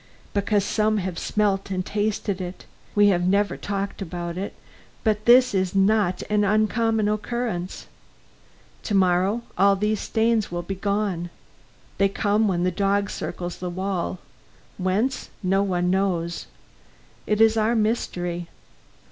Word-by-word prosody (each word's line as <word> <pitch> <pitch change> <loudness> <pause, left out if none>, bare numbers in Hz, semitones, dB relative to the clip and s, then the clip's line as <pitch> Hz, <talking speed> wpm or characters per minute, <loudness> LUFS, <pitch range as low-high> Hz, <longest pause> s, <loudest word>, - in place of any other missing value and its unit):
"Because 200 0 +1
some 215 +1 +1
have 185 -3 -3
smelt 200 -2 0
and 185 -1 -2
tasted 205 -2 -1
it. 180 0 -7 0.3
We 205 0 +6
have 175 -2 +2
never 200 +2 +2
talked 200 0 -4
about 175 -2 -4
it, 190 +2 -5 0.5
but 215 -1 +1
this 250 0 +6
is 190 -1 0
not 195 -2 +2
an 210 0 +2
uncommon 215 +1 +2
occurrence. 215 -3 -3 1.0
To 210 - -2
morrow 190 +4 +2 0.2
all 200 0 +5
these 210 +1 0
stains 225 -2 +1
will 175 0 -3
be 195 - -4
gone. 195 -3 -1 0.7
They 195 0 +4
come 210 +2 +1
when 175 -3 0
the 180 - +2
dog 200 +2 0
circles 175 0 -5
the 180 - -3
wall. 185 0 -2 0.6
Whence, 205 +8 0
no 190 +1 +2
one 180 -2 0
knows. 180 -3 -1 0.8
It 210 0 +1
is 225 0 +5
our 220 +2 +2
mystery. 180 -6 -1
200 Hz, 140 wpm, -24 LUFS, 185-215 Hz, 1.0 s, We